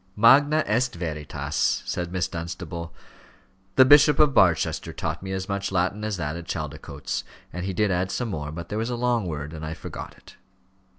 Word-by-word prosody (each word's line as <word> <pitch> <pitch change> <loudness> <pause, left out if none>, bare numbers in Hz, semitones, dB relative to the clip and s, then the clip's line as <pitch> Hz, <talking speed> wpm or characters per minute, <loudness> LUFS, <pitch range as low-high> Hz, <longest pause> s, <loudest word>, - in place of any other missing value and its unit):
"Magna 145 +8 +6
est 120 +3 +1
veritas," 75 -4 -1
said 90 -1 -3
Miss 90 -3 0
Dunstable. 85 0 -6 0.8
"The 130 - +8
Bishop 145 +1 +7
of 150 -2 +5
Barchester 85 -8 +2
taught - - -3
me 95 0 -6
as 95 0 -3
much 100 0 -2
Latin 95 +3 0
as 105 -2 -2
that 75 -2 -3
at 85 -1 -8
Chaldicotes; 75 -3 -4 0.3
and 90 +1 -4
he 95 - -2
did 105 +2 +1
add 90 +1 0
some 120 +4 -2
more, 75 -6 -4
but 85 +2 -7
there 105 - -2
was 115 +2 -1
a 120 - -1
long 120 -4 0
word, 75 -1 -5
and 80 -1 -7
I 80 +1 -4
forgot - - -8
it." - - -17
95 Hz, 190 wpm, -25 LUFS, 85-115 Hz, 0.8 s, The